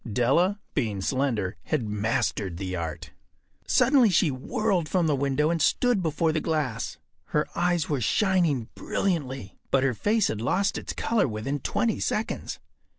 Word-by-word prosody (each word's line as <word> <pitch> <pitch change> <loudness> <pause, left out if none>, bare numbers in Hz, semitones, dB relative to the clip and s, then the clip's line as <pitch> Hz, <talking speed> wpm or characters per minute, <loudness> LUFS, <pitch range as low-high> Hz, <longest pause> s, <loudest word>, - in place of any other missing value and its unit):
Della, 165 - +2
being 105 -4 -1
slender, 115 -7 -1
had 130 -8 -1
mastered 105 -3 -1
the 95 0 -4
art. 80 -3 -5 0.6
Suddenly 250 -2 +5
she 170 -3 +3
whirled 170 +6 -1
from 180 -3 +2
the 150 -2 +2
window 140 +3 +1
and 165 -2 -1
stood 245 - +2
before 160 -1 +1
the 155 - 0
glass. 150 -8 -2 0.3
Her 150 - 0
eyes 175 -2 +1
were 145 -4 -1
shining 170 - +2
brilliantly, 135 - -2
but 135 -1 +3
her 135 -2 +2
face 210 - +1
had 110 - -3
lost 195 - +1
its - - -6
color 230 -7 +1
within 115 +6 -3
twenty 225 - 0
seconds. 215 - -2
145 Hz, 150 wpm, -26 LUFS, 115-180 Hz, 0.6 s, Suddenly